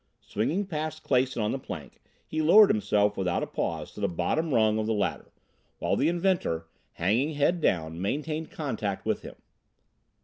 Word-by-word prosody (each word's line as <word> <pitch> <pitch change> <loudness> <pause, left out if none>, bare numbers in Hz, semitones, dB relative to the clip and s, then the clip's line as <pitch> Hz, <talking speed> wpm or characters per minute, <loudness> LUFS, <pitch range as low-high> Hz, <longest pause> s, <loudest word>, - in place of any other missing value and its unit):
Swinging 160 - -1
past 155 -3 -4
Clason 130 -3 +1
on 105 - 0
the 135 - -2
plank, - - -9 0.2
he 155 - -2
lowered 195 +7 +7
himself 105 -1 +2
without 90 -2 0
a - - 0
pause - - -3
to - - -11
the 100 - +2
bottom 95 - -1
rung 110 -3 +3
of 110 - -1
the 110 - +1
ladder, 105 - -2 0.5
while - - 0
the 150 - +2
inventor, 175 - 0 0.3
hanging 115 - +1
head 165 +4 +2
down, 80 - 0
maintained 155 +9 -2
contact 110 -10 -3
with - - 0
him. - - -10
130 Hz, 170 wpm, -28 LUFS, 100-155 Hz, 0.5 s, lowered